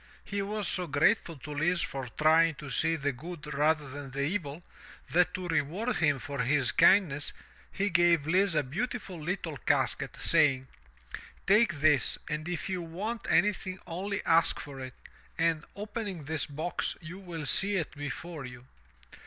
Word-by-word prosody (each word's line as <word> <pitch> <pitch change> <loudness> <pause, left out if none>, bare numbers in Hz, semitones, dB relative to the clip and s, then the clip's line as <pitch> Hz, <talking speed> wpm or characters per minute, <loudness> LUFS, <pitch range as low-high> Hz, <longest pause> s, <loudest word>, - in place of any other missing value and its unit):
He 200 0 -2
was 205 0 -2
so 180 0 0
grateful 160 +3 +2
to 150 +2 -8
Lise 170 +4 +1
for 135 -2 -4
trying 160 +1 +5
to 140 -1 -8
see 165 +5 +1
the 145 -2 -1
good 150 +2 -8
rather 150 +1 +2
than 140 +1 -7
the 140 +2 -2
evil, 160 -1 -3 0.5
that 180 +1 +4
to 185 -1 -4
reward 170 - 0
him 145 -4 +3
for 140 +1 -6
his 130 0 +2
kindness 165 -7 +4 0.4
he 200 0 -1
gave 170 -3 +4
Lise 185 +2 +2
a 150 - +3
beautiful 185 - -4
little 165 -2 -3
casket, - - 0
saying: 135 -3 +3 0.8
"Take 210 -1 +4
this 145 -2 +4
and 155 +2 -3
if 175 -3 -3
you 185 -2 -2
want 200 +8 -5
anything 190 -2 +2
only 190 +4 -4
ask 165 0 +3
for 140 -2 -8
it, 130 0 -7 0.4
and, 165 -2 +1
opening 205 -4 -5
this 155 0 -2
box, 155 +5 -3
you 175 +3 -9
will 170 -5 -6
see 200 +8 +3
it 165 -5 -1
before 150 +2 -6
you." 125 -1 -10
165 Hz, 160 wpm, -30 LUFS, 145-185 Hz, 0.8 s, trying